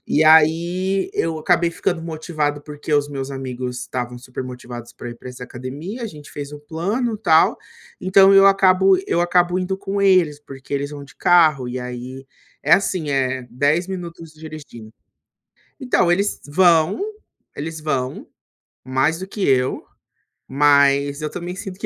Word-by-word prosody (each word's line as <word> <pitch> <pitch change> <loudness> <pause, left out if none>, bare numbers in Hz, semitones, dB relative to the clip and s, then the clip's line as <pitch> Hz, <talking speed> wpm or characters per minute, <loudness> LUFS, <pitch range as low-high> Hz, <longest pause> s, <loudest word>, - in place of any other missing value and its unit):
E 155 - +2
aí 170 +5 +3
eu 165 -1 -1
acabei 170 +1 +2
ficando 175 -1 -2
motivado, 155 -3 -3
porque 150 +1 -7
os 145 0 +1
meus 135 -1 -5
amigos 125 -2 -5
estavam 125 -1 -5
supermotivados 125 -1 -8
pra 120 - -9
ir 120 - -10
pra 125 - -11
essa 125 0 -8
academia, 140 - -7
a - - -2
gente 150 -7 -12
fez 145 0 -7
o 145 - -9
plano, 205 - -2
tal. 160 -7 +4 0.4
Então 190 +1 +5
eu 195 0 +7
acabo 190 -1 +5
eu 170 - +1
acabo 175 +1 +2
indo 190 +1 -2
com 195 +1 -3
eles, 185 -7 +3
porque 135 -1 -12
eles 140 +1 -2
vão 145 -1 -8
de 140 - -18
carro 155 -8 +4
e 130 +1 -4
aí 125 +2 -7 0.4
é - - +2
assim, 180 -6 +2
eh, 130 -2 -1
10 145 +8 +1
minutos 170 -3 -7
dirigindo. 155 -8 -11 0.9
Então, 250 -10 +1
eles 200 +4 0
vão 165 - +3 0.5
eles 160 +2 -6
vão, 135 -4 -3 0.6
mais 135 +6 0
do 190 - -6
que 200 0 -3
eu, 130 -1 +1 0.6
mas 140 +1 +3
eu 150 - -3
também 180 +1 -6
sinto 195 -1 -8
que - - -4
155 Hz, 160 wpm, -20 LUFS, 135-180 Hz, 0.9 s, eu